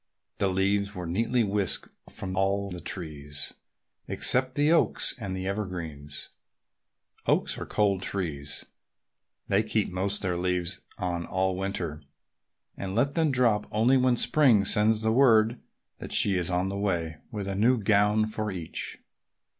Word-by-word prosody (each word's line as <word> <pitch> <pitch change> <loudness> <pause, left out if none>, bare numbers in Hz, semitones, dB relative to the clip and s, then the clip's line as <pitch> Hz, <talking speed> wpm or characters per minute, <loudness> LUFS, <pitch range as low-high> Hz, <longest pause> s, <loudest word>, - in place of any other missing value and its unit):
The 100 - +3
leaves 100 +2 0
were 90 -1 -5
neatly 115 +8 +1
whisked 100 -2 0 0.2
from 95 0 -4
all 100 +1 0
the 90 -1 -6
trees 75 -5 -5 0.5
except 130 0 +2
the 145 +2 +3
oaks 170 - +2
and 95 -4 -4
the 95 - -4
evergreens. 85 -8 -5 1.0
Oaks - - +2
are - - -6
cold 100 -3 +1
trees. 75 -8 -3 0.8
They 100 +1 +3
keep 110 -2 -1
most 95 +2 -1
of - - -5
their 90 -2 0
leaves 90 -1 -1 0.2
on 85 -1 -3
all 95 0 0
winter 90 -5 -3 0.7
and 95 0 -5
let 135 +5 +2
them 160 -2 +2
drop 115 -5 +2
only 115 +5 +3
when 130 -1 +3
Spring 120 -11 +4
sends 110 +2 +3
word 115 -1 +4 0.4
that - - -8
she 100 -2 +4
is 90 -1 0
on 90 +1 0
the 100 0 -4
way 85 -5 -1
with 105 -3 -5
a 100 - -2
new 115 +6 +3
gown 105 0 +3
for 110 0 -3
each. 85 -4 -5
100 Hz, 150 wpm, -27 LUFS, 90-110 Hz, 1.0 s, Spring